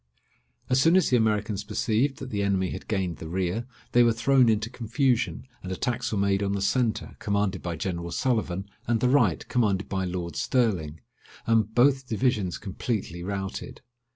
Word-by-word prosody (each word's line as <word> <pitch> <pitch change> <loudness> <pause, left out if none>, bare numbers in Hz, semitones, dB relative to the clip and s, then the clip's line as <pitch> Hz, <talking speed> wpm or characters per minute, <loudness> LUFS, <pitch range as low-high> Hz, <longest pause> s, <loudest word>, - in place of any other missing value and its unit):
As 130 +1 +3
soon 165 +4 +5
as 185 - +3
the - - +5
Americans 105 -2 0
perceived 115 +5 0
that 130 - -7
the 100 -2 -1
enemy 95 -2 +1
had - - -7
gained 95 -5 -1
the 80 - -8
rear, 95 +7 -2 0.2
they 120 - +5
were 120 -1 +5
thrown 125 +1 +4
into 110 0 +1
confusion, 125 +1 0 0.2
and 90 - -6
attacks 120 +5 -2
were 105 - -1
made 100 0 +2
on 100 0 0
the 100 - -1
centre, 115 +2 0
commanded 100 -3 0
by 85 -2 -3
General 85 0 -3
Sullivan, 100 -3 -1 0.2
and 115 -1 +2
the 125 - +2
right, 120 - +2
commanded 105 -5 +1
by 95 -1 -2
Lord 90 -1 -4
Stirling, 90 - 0 0.4
and 110 -1 +2
both 130 +1 +4
divisions 110 -6 0
completely 95 -3 -4
routed. 95 0 -5
105 Hz, 175 wpm, -26 LUFS, 95-120 Hz, 0.4 s, soon